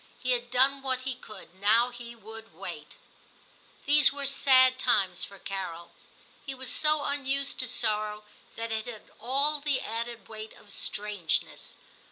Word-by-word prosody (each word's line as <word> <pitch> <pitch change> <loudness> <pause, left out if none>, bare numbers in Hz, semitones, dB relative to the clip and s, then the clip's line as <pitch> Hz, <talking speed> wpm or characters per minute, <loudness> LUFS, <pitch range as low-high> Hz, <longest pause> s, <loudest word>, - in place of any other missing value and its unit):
He 255 - -3
had 240 -1 -1
done 265 +2 +3
what 260 -1 -1
he 260 0 -4
could; 215 -8 -13
now 215 +6 +2
he 240 -1 -10
would 225 0 -12
wait. - - -9 0.9
These 290 0 +6
were 280 0 -6
sad 260 -2 +4
times 195 -8 +1
for 200 - -7
Carol; 185 -4 -7 0.5
he 270 -1 -6
was 260 -1 +1
so 305 -1 +4
unused 275 0 0
to 255 - +1
sorrow 215 -2 0 0.3
that 230 0 -5
it 220 +1 -3
had 225 -3 -10
all 280 +6 +3
the 285 -2 0
added 230 +1 -6
weight 220 0 -9
of 205 - -15
strangeness. 205 -6 -1
240 Hz, 155 wpm, -27 LUFS, 215-270 Hz, 0.9 s, These